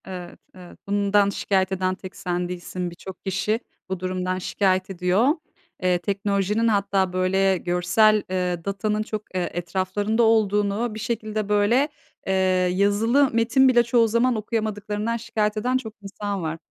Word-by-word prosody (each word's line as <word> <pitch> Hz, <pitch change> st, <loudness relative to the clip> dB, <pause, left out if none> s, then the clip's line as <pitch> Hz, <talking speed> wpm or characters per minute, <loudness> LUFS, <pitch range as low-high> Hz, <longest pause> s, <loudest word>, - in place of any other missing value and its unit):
Evet, 180 Hz, -2 st, -8 dB, 0.2 s
evet. 180 Hz, -1 st, -13 dB
Bundan 200 Hz, 0 st, +2 dB
şikayet 195 Hz, -1 st, 0 dB
eden 185 Hz, 0 st, 0 dB
tek 185 Hz, 0 st, -10 dB
sen 175 Hz, -1 st, -3 dB
değilsin. 180 Hz, 0 st, -4 dB
Birçok 185 Hz, +2 st, -11 dB
kişi 210 Hz, +3 st, 0 dB, 0.3 s
bu 190 Hz, -1 st, -3 dB
durumdan 185 Hz, 0 st, -2 dB
şikayet 185 Hz, 0 st, 0 dB
ediyor. 185 Hz, +5 st, +1 dB, 0.6 s
Eee, 180 Hz, -1 st, +3 dB
teknolojinin 200 Hz, +3 st, 0 dB
hatta, 200 Hz, -3 st, +1 dB
böyle, 190 Hz, +1 st, +2 dB
görsel, 180 Hz, +5 st, +3 dB
eee, 180 Hz, -2 st, -2 dB
datanın 210 Hz, +2 st, -1 dB
çok, 215 Hz, -1 st, -4 dB
eee, 180 Hz, -1 st, -1 dB
etraflarında 190 Hz, +6 st, -1 dB
olduğunu, 215 Hz, 0 st, +2 dB
bir -, -, -6 dB
şekilde, 215 Hz, -2 st, -3 dB
böyle, 220 Hz, +8 st, +3 dB, 0.4 s
eee, 190 Hz, -, +1 dB, 0.4 s
yazılı 220 Hz, +8 st, +3 dB
metin 230 Hz, +4 st, +4 dB
bile 240 Hz, -2 st, +5 dB
çoğu 235 Hz, -1 st, +3 dB
zaman 235 Hz, +3 st, +2 dB
okuyamadıklarından 215 Hz, 0 st, -2 dB
şikayet 220 Hz, -2 st, -1 dB
eden 250 Hz, +4 st, +1 dB
çok 225 Hz, -4 st, -7 dB
insan 200 Hz, 0 st, -4 dB
var. 160 Hz, 0 st, -3 dB
200 Hz, 145 wpm, -24 LUFS, 185-220 Hz, 0.6 s, bile